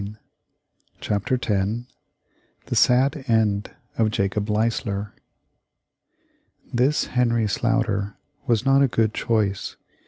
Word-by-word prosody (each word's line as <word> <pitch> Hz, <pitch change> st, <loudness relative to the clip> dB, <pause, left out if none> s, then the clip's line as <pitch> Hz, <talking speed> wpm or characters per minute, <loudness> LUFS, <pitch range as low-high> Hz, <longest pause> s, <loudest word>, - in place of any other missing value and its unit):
] -, -, -43 dB
CHAPTER 105 Hz, +5 st, -1 dB
X 110 Hz, 0 st, -1 dB, 0.8 s
THE -, -, -3 dB
SAD 135 Hz, +4 st, +3 dB
END 110 Hz, -3 st, +1 dB, 0.3 s
of 110 Hz, -1 st, +3 dB
JACOB 100 Hz, 0 st, -1 dB
LEISLER 105 Hz, -2 st, -1 dB, 1.6 s
This 130 Hz, +5 st, +2 dB
Henry 120 Hz, -3 st, +2 dB
Sloughter 105 Hz, -2 st, 0 dB, 0.3 s
was 115 Hz, +1 st, +1 dB
not 135 Hz, 0 st, +5 dB
a 140 Hz, -, +5 dB
good 110 Hz, -3 st, +1 dB
choice. 105 Hz, -4 st, -1 dB
110 Hz, 100 wpm, -23 LUFS, 105-120 Hz, 1.6 s, not